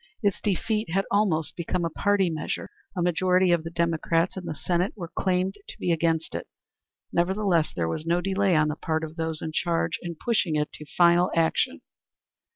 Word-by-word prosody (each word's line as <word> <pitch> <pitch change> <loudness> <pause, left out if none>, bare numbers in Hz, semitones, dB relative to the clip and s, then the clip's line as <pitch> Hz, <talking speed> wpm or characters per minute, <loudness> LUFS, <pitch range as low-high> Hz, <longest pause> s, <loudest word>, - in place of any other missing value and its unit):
Its 200 -2 +1
defeat 210 +1 0
had 195 +3 +1
almost 190 -7 +1
become 170 0 -1
a - - 0
party 200 +2 +2
measure. 155 -1 -4 0.3
A 175 - +1
majority 180 +1 +3
of 170 -2 +2
the 165 - -5
Democrats 170 +1 +1
in 185 -2 -6
the 155 - -4
Senate 175 +5 0
were 170 -5 -7
claimed 185 0 +1
to - - -9
be 175 - 0
against 165 -1 +1
it. - - -4 0.7
Nevertheless 175 -2 +2
there 85 -2 -1
was 80 - -3
no 170 +2 +1
delay 195 0 +1
on 155 0 +3
the 150 - -2
part 160 0 -2
of 160 0 -6
those 160 -1 -3
in 160 - -3
charge 165 0 0
in 170 -1 -5
pushing 200 -4 0
it 150 0 0
to 150 - -10
final 175 +1 +5
action. 165 -1 +1
170 Hz, 190 wpm, -26 LUFS, 160-185 Hz, 0.7 s, final